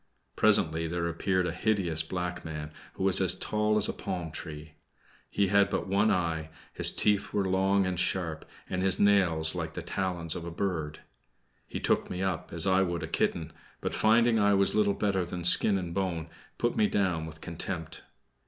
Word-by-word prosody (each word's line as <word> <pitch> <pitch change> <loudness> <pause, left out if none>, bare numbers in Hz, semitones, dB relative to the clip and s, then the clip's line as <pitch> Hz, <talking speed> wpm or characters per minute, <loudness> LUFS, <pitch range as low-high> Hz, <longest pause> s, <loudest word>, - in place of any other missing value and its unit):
Presently 80 +1 +3
there 85 +1 -2
appeared 90 +2 0
a 85 - -1
hideous 90 -4 +1
black 90 +2 -4
man, 75 -1 -6 0.2
who - - -5
was 95 0 +5
as 95 - +3
tall 105 0 0
as 105 - +2
a - - -3
palm 90 -4 -5
tree. 75 0 -8 0.6
He 100 -2 0
had 100 0 +4
but 100 - -2
one 100 +2 +2
eye, 85 -5 -1 0.2
his - - +5
teeth 105 -2 +1
were 100 -2 0
long 95 +1 +2
and 90 -1 -2
sharp, 90 -3 -1 0.2
and 90 - -3
his 95 0 +2
nails 90 -6 +3
like - - -5
the - - -5
talons 90 -4 -2
of - - -6
a 85 - -5
bird. 80 -4 -3 0.7
He - - -5
took - - 0
me 90 +1 -3
up 95 -4 -3
as 85 +1 0
I 95 0 +3
would 85 -3 -2
a - - -4
kitten, - - -2 0.3
but - - -4
finding 115 +1 +3
I 100 -1 +3
was 100 0 +2
little 105 -2 +2
better 95 -3 0
than 90 0 -6
skin 95 +3 +6
and 90 -3 -5
bone, 85 -4 -3 0.3
put 120 - -1
me 105 - +3
down 90 -6 -1
with 80 0 -11
contempt. 80 0 -5
90 Hz, 190 wpm, -28 LUFS, 85-100 Hz, 0.7 s, skin